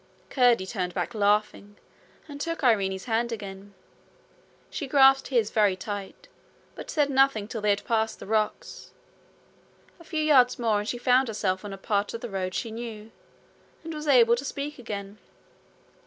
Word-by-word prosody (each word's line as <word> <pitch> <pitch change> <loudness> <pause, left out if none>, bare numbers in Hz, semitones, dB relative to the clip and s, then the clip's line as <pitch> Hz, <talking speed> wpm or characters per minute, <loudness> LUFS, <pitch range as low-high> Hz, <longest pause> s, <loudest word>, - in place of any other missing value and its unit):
Curdie 245 -7 +3
turned 185 -3 -4
back - - -2
laughing, 205 -1 0 0.5
and 285 -1 -8
took 330 -1 -4
Irene's 195 -6 +1
hand 235 0 0
again. 200 -2 -8 1.0
She 285 - -4
grasped 270 0 +5
his 235 -5 +1
very 205 -3 +3
tight, 200 0 -7 0.5
but - - -10
said 290 -2 +1
nothing 270 -6 +2
till 225 -1 -5
they 210 - +1
had 200 0 0
passed 220 -1 0
the - - -9
rocks. 220 - -3 1.1
A - - -14
few 315 -2 -2
yards 260 -5 +4
more 225 -3 +1
and 210 - -4
she 245 - -2
found 250 +2 +3
herself 195 -4 -2
on 205 - -7
a 195 - -7
part 205 +2 -1
of 230 - -6
the 240 - -6
road 185 -1 -3
she 230 - -3
knew, 225 -1 -8 0.7
and 325 0 -6
was 305 0 -6
able 235 -4 +6
to 260 - -5
speak 280 +1 -5
again. 205 -3 -7
225 Hz, 170 wpm, -26 LUFS, 205-265 Hz, 1.1 s, able